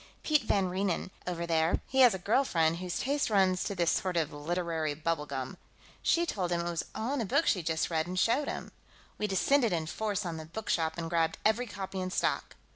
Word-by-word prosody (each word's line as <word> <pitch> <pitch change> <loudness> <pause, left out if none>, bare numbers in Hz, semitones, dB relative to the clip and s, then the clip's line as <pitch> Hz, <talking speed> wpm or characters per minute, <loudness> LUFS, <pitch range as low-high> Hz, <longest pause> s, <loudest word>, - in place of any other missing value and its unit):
"Piet 300 -2 +3
van 200 -4 +1
Reenen, 185 0 -1 0.2
over 170 -1 -2
there, 165 0 +2
he 265 - -1
has 245 -6 +7
a - - -2
girl 215 +9 +2
friend 165 -8 +2
whose 180 0 -3
taste 280 0 0
runs 190 -3 +3
to 200 - -3
this 170 -2 +2
sort 185 -2 0
of 160 -3 0
literary 160 0 -2
bubble 155 -1 -2
gum. 135 -2 -5 0.4
She 340 0 +3
told 185 - -2
him 170 -1 +1
it 170 - -2
was 170 - -2
all 230 +5 -2
in 285 - 0
a - - -1
book 190 - +2
she'd 175 -5 +1
just 160 +1 0
read, 160 0 0
and 180 +1 -4
showed 255 +9 +2
him. - - -5 0.5
We 210 - 0
descended 230 +5 +3
in 165 -2 0
force 205 +3 -2
on 170 -2 -3
the 160 - -7
bookshop 165 -3 -1
and 165 -1 -3
grabbed 165 -1 +1
every 230 +3 +2
copy 195 -2 -5
in 185 - -2
stock. - - -1
180 Hz, 225 wpm, -30 LUFS, 165-210 Hz, 0.5 s, has